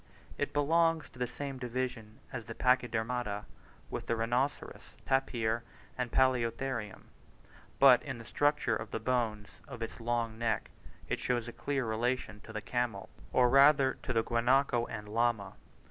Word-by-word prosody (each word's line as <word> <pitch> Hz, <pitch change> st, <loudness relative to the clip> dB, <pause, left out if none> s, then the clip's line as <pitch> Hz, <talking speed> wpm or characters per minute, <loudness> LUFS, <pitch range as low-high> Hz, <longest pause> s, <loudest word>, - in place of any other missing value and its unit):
It 145 Hz, -, -2 dB
belongs 165 Hz, +2 st, +2 dB
to 125 Hz, -, -15 dB
the 125 Hz, -, 0 dB
same 135 Hz, +1 st, -6 dB
division 125 Hz, -3 st, -4 dB
of 115 Hz, -4 st, -5 dB
the 115 Hz, -, -6 dB
Pachydermata 120 Hz, -4 st, 0 dB, 0.5 s
with -, -, -5 dB
the 115 Hz, -, +1 dB
rhinoceros, 120 Hz, +5 st, -2 dB
tapir, 120 Hz, -4 st, +1 dB, 0.3 s
and 125 Hz, -2 st, -3 dB
palaeotherium; 125 Hz, -3 st, 0 dB, 0.8 s
but 135 Hz, -3 st, +7 dB
in 135 Hz, -4 st, -5 dB
the 115 Hz, -, -10 dB
structure 145 Hz, -3 st, +1 dB
of 110 Hz, -, -5 dB
the -, -, -3 dB
bones 110 Hz, -3 st, -2 dB
of 115 Hz, -, -6 dB
its 115 Hz, -, -6 dB
long 115 Hz, -1 st, -1 dB
neck 115 Hz, -2 st, -1 dB, 0.4 s
it -, -, -1 dB
shows 120 Hz, -2 st, -1 dB
a 120 Hz, -, -7 dB
clear 140 Hz, -3 st, -2 dB
relation 110 Hz, -1 st, -1 dB
to -, -, -9 dB
the 110 Hz, -1 st, -4 dB
camel, 120 Hz, -5 st, -2 dB, 0.2 s
or 125 Hz, -1 st, +5 dB
rather 135 Hz, +1 st, +6 dB
to -, -, -3 dB
the 115 Hz, -2 st, +2 dB
guanaco 120 Hz, +1 st, +2 dB
and 105 Hz, 0 st, -6 dB
llama. 115 Hz, -2 st, 0 dB
120 Hz, 155 wpm, -32 LUFS, 115-130 Hz, 0.8 s, but